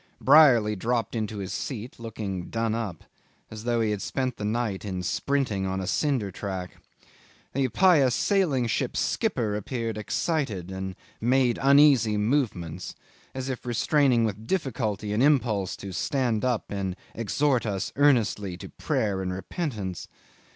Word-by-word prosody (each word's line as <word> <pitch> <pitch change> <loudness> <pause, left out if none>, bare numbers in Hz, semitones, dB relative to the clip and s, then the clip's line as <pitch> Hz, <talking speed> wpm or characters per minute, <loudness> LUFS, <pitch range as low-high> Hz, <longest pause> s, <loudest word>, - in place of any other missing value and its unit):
Brierly 130 -7 +6
dropped 115 +2 -1
into 110 -2 -3
his 95 -1 -4
seat 120 -3 -5
looking 105 -6 -5
done 115 -1 -1
up, 110 -8 -4 0.5
as 110 0 -8
though 120 -1 +1
he 110 -1 +1
had 105 -2 -2
spent 130 +2 -2
the - - -6
night 105 -2 -1
in 95 -3 -4
sprinting 110 -3 0
on 95 0 -2
a 95 - -3
cinder 110 +1 0
track. 95 -2 -5 0.8
The 135 0 +1
pious 140 -5 +4
sailing 170 - +2
ship 115 - -1
skipper 105 -3 0
appeared 115 0 -3
excited 105 - -2
and 95 0 -5 0.3
made 125 0 +2
uneasy 135 -6 +5
movements, 105 - -1 0.4
as 130 0 -4
if 130 -2 -4
restraining 125 0 +2
with 110 +1 -4
difficulty 110 - -1
an 110 - +1
impulse 120 -10 +2
to 100 - -8
stand 120 - 0
up 125 -3 -1
and 95 -2 -2 0.2
exhort 120 +2 0
us 100 -1 -3
earnestly 110 -9 +2
to - - -9
prayer 100 -3 -1
and 90 -1 -2
repentance. 100 - -4
115 Hz, 145 wpm, -26 LUFS, 100-130 Hz, 0.8 s, Brierly